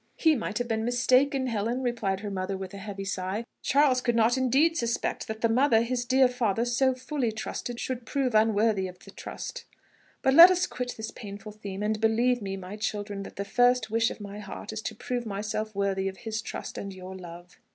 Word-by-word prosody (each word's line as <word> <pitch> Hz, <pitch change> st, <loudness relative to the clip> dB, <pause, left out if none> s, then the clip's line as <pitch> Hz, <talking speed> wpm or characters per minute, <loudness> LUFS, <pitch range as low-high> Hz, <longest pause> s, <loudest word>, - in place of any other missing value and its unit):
"He 320 Hz, -1 st, +4 dB
might 220 Hz, -4 st, -3 dB
have 245 Hz, 0 st, -1 dB
been 220 Hz, -1 st, -1 dB
mistaken, 255 Hz, +3 st, +3 dB
Helen," 235 Hz, +2 st, -1 dB
replied 215 Hz, -6 st, -1 dB
her 205 Hz, -1 st, -4 dB
mother 190 Hz, 0 st, -2 dB
with 190 Hz, 0 st, -7 dB
a 200 Hz, -, -7 dB
heavy 195 Hz, -1 st, -6 dB
sigh: 195 Hz, +3 st, -3 dB, 0.2 s
"Charles 275 Hz, -2 st, +3 dB
could 240 Hz, -2 st, +1 dB
not 230 Hz, +1 st, +4 dB
indeed 265 Hz, +6 st, +3 dB
suspect 235 Hz, -6 st, -1 dB
that 220 Hz, 0 st, -5 dB
the 230 Hz, -, +4 dB
mother 230 Hz, -1 st, +4 dB
his 245 Hz, +1 st, -2 dB
dear 260 Hz, +1 st, +5 dB
father 235 Hz, -3 st, 0 dB
so 255 Hz, +2 st, +2 dB
fully 255 Hz, -2 st, -2 dB
trusted 235 Hz, +2 st, -5 dB
should 255 Hz, -2 st, -3 dB
prove 270 Hz, -4 st, 0 dB
unworthy 215 Hz, -2 st, +3 dB
of 180 Hz, 0 st, -10 dB
the -, -, -14 dB
trust. -, -, -7 dB, 0.6 s
But 265 Hz, -, +4 dB
let 335 Hz, +5 st, +11 dB
us 360 Hz, 0 st, +2 dB
quit 250 Hz, -5 st, -5 dB
this 220 Hz, 0 st, -5 dB
painful 205 Hz, -1 st, -9 dB
theme; 205 Hz, -1 st, -6 dB
and 215 Hz, 0 st, -1 dB
believe 235 Hz, +2 st, +2 dB
me, 195 Hz, -1 st, -4 dB
my 190 Hz, +2 st, -8 dB
children, 205 Hz, -1 st, -3 dB
that -, -, -9 dB
the 200 Hz, -, -3 dB
first 245 Hz, +1 st, +3 dB
wish 225 Hz, 0 st, +3 dB
of -, -, -8 dB
my 205 Hz, 0 st, -7 dB
heart 210 Hz, -, -7 dB
is 215 Hz, -, -4 dB
to 220 Hz, -, -5 dB
prove 240 Hz, +1 st, -3 dB
myself 215 Hz, +1 st, -3 dB
worthy 195 Hz, -1 st, 0 dB
of 190 Hz, 0 st, -5 dB
his 220 Hz, -2 st, -4 dB
trust -, -, -6 dB
and 200 Hz, -, -5 dB
your 185 Hz, 0 st, -9 dB
love." 175 Hz, 0 st, -11 dB
220 Hz, 215 wpm, -28 LUFS, 200-250 Hz, 0.6 s, let